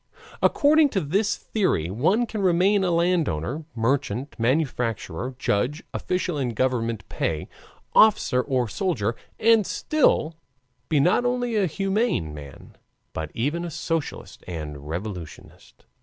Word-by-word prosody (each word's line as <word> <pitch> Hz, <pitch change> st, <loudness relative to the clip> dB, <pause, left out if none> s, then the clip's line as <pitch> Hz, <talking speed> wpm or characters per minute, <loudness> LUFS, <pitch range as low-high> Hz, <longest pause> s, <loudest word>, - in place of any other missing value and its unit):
According 300 Hz, 0 st, +4 dB
to 205 Hz, -, 0 dB
this 195 Hz, +7 st, 0 dB
theory 140 Hz, -, -1 dB
one 185 Hz, -, +2 dB
can 220 Hz, -2 st, -4 dB
remain 190 Hz, +2 st, +3 dB
a 185 Hz, -, +1 dB
landowner, 160 Hz, -, 0 dB
merchant, 130 Hz, +2 st, -1 dB
manufacturer, 125 Hz, -, -1 dB
judge, 130 Hz, +6 st, 0 dB
official 180 Hz, -4 st, -2 dB
in 120 Hz, -4 st, -2 dB
government 115 Hz, -4 st, -1 dB
pay, 80 Hz, -2 st, -2 dB, 0.5 s
officer 215 Hz, -12 st, +5 dB
or 130 Hz, -3 st, 0 dB
soldier, 120 Hz, -, -1 dB, 0.2 s
and 225 Hz, -1 st, +5 dB
still 195 Hz, -, +1 dB, 0.6 s
be 155 Hz, -, +3 dB
not 180 Hz, -, +3 dB
only 245 Hz, -1 st, 0 dB
a 200 Hz, -3 st, +2 dB
humane 195 Hz, -, 0 dB
man, 70 Hz, -3 st, -11 dB, 0.4 s
but 80 Hz, -1 st, -4 dB
even 150 Hz, +9 st, -1 dB
a 175 Hz, -, -4 dB
socialist 165 Hz, 0 st, -4 dB
and 75 Hz, -4 st, -6 dB
revolutionist. 90 Hz, -1 st, -8 dB
145 Hz, 125 wpm, -24 LUFS, -, 0.6 s, officer